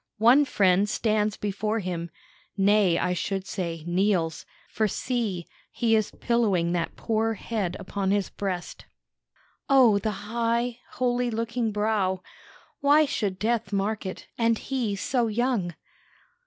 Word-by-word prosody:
One 245 +7 +6
friend 195 -4 +3
stands 215 -1 0
before 210 +2 -2
him 175 -4 -3 0.5
nay, 195 -3 +4
I 180 - 0
should 195 +1 -2
say, 170 -6 -4
kneels; 175 -2 0 0.2
for 215 0 0
see, 210 -6 -2 0.2
he 225 -2 +1
is 215 -2 +1
pillowing 205 -8 +1
that 175 -1 -2
poor 225 0 0
head 205 -4 -3
upon 195 -1 -2
his 200 -1 +1
breast. 185 -3 -4 0.8
"O, 250 -7 +6
the 205 0 -4
high, 235 +1 0
holy 245 0 0
looking 230 0 -1
brow! 205 -3 0 0.6
Why 295 +2 +5
should 205 -9 -2
death 220 0 -1
mark 205 +1 -1
it, 185 - -7
and 230 -1 +3
he 240 -6 -2
so 240 +4 0
young? 220 -6 0
210 Hz, 130 wpm, -26 LUFS, 190-230 Hz, 0.8 s, One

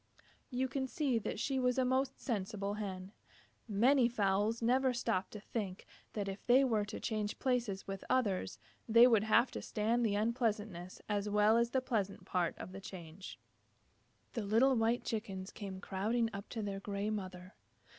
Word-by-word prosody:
You 260 0 0
can 265 0 -2
see 260 -4 0
that 210 - -4
she 270 +2 0
was 250 0 +2
a 260 - +3
most 260 +1 0
sensible 205 -3 -2
Hen. 195 -3 -5 0.6
Many 240 +4 +4
fowls 210 0 +1
never 255 +2 +2
stop 225 -6 0
to 210 - -8
think 200 -3 -5 0.3
that 205 -2 -2
if 195 0 -5
they 255 +3 +6
were 220 -5 +2
to 210 - -6
change 215 -1 -2
places 240 -7 -1
with 195 -1 -5
others, 220 -8 +1 0.3
they 230 +2 +8
would 225 -4 +5
have 235 +3 +4
to - - -5
stand 230 +3 0
the 210 -3 +2
unpleasant 220 -2 0 0.3
as 210 0 -1
well 210 +1 +4
as 235 0 +3
the 260 +1 +1
pleasant 205 -6 -2
part 180 -2 0
of - - -7
the 195 +1 -8
change. 185 -1 -9 1.0
The 230 - -2
little 230 +6 +4
white 230 +1 +2
Chickens 195 -4 -4
came 195 -4 -7
crowding 220 +5 0
up 200 +1 -7
to 225 -3 -4
their 200 -1 -3
gray 200 +1 -2
mother. 185 -2 -5
215 Hz, 175 wpm, -35 LUFS, 200-240 Hz, 1.0 s, they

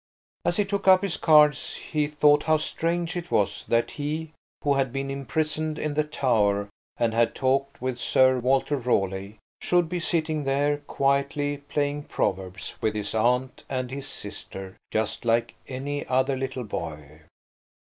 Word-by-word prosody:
As 175 - 0
he 205 - +2
took 200 0 -3
up 185 0 +7
his 195 -4 -1
cards 150 -2 +4
he 150 -2 -1
thought 150 0 +4
how 155 -1 +4
strange 170 +2 -2
it 175 -1 -4
was 100 -2 0
that 115 0 +2
he, 155 +2 -4 0.3
who 145 - +3
had 135 -2 +1
been 135 +1 -3
imprisoned 155 +3 -2
in 150 -2 -2
the 150 +1 +2
Tower 105 -9 +1 0.3
and 115 -1 +1
had 115 0 +2
talked 135 +1 0
with 130 -1 -2
Sir 130 +1 +4
Walter 135 +3 +2
Raleigh, 100 -4 -1 0.2
should 175 -1 +2
be 180 0 -2
sitting 155 -3 0
there 140 +2 +1
quietly 140 +1 +1
playing 145 0 -1
Proverbs 95 -2 -2
with 110 -1 0
his 105 -1 -3
aunt 125 +3 +1
and 130 -2 -2
his 135 0 -5
sister, 95 -1 -7
just 110 0 -1
like 115 0 +1
any 140 +2 -3
other 130 +1 +2
little 130 -1 -3
boy. 75 -7 -6
135 Hz, 160 wpm, -26 LUFS, 115-150 Hz, 0.3 s, up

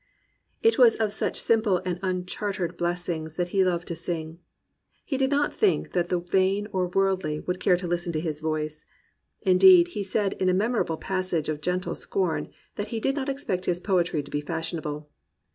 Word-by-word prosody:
'* - - -43
It 455 -8 +4
was 240 -3 +7
of 215 -2 -1
such - - -1
simple 220 -4 +2
and 180 -1 -2
unchartered 185 -1 -2
blessings 170 -2 -3
that 175 0 -1
he 190 +1 +3
loved 175 -2 0
to 170 - -3
sing. 165 -1 -5 0.7
He 280 - -2
did 265 0 +1
not 290 +1 +1
think 415 -3 +1
that 175 -1 0
the 180 -1 0
vain 190 +3 +1
or 180 -1 0
the 180 - -5
woridly 190 -6 +1
would 180 0 -3
care 180 - +3
to 180 - -5
listen 175 0 -1
to 155 - 0
his 155 -2 -3
voice. 155 -1 -3 0.6
Indeed 345 - +7
he 205 -12 -4
said 195 +1 0
in 185 - +3
a 180 - +3
memorable 210 -5 0
passage 185 -5 -2
of 150 -1 -3
gentle 180 +3 -1
scorn 185 -5 -2 0.3
that 205 - -3
he 225 +1 -3
did 270 +5 0
not 280 -1 -2
expect 230 -10 -2
his 175 -1 +1
poetry 175 -6 0
to 145 - -13
be 145 - -1
fashionable. 155 -2 -4
180 Hz, 195 wpm, -26 LUFS, 170-205 Hz, 0.7 s, was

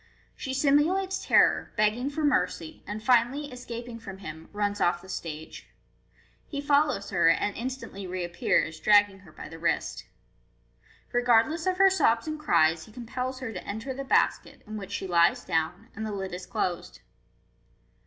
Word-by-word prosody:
She 265 -1 -4
simulates 320 +8 +2
terror, - - +3
begging 215 +5 +2
for 305 +2 -3
mercy, 180 - 0
and 210 +2 -5
finally 255 +5 +2
escaping 240 -1 -7
from 195 -4 -9
him, 160 -4 -9
runs 205 0 -2
off 175 0 +2
the 190 - -15
stage. 160 -3 -7 0.8
He 285 - -5
follows 285 -7 +1
her, 170 -3 +4
and 200 +4 +1
instantly 235 -6 -6
reappears, 175 -3 0
dragging 205 +2 +4
her 185 -5 -17
by - - -9
the 165 - -10
wrist 170 - -1 1.1
Regardless 245 +7 +3
of 370 0 +1
her 385 0 +6
sobs 230 -9 +2
and 310 0 -3
cries, 160 - +2
he - - -16
com 240 +2 -9
pels 255 +2 -4
her 225 -3 -5
to 180 - -6
enter 220 +6 -5
the 275 +1 -5
basket, 270 - +1
in 215 - -7
which 200 -2 -7
she 205 - -3
lies 170 -2 +3
down, 165 +6 -1
and 220 0 -4
ihe - - -4
lid 190 -2 -4
is 180 - -7
closed. 130 - -3
215 Hz, 165 wpm, -27 LUFS, 180-265 Hz, 1.1 s, her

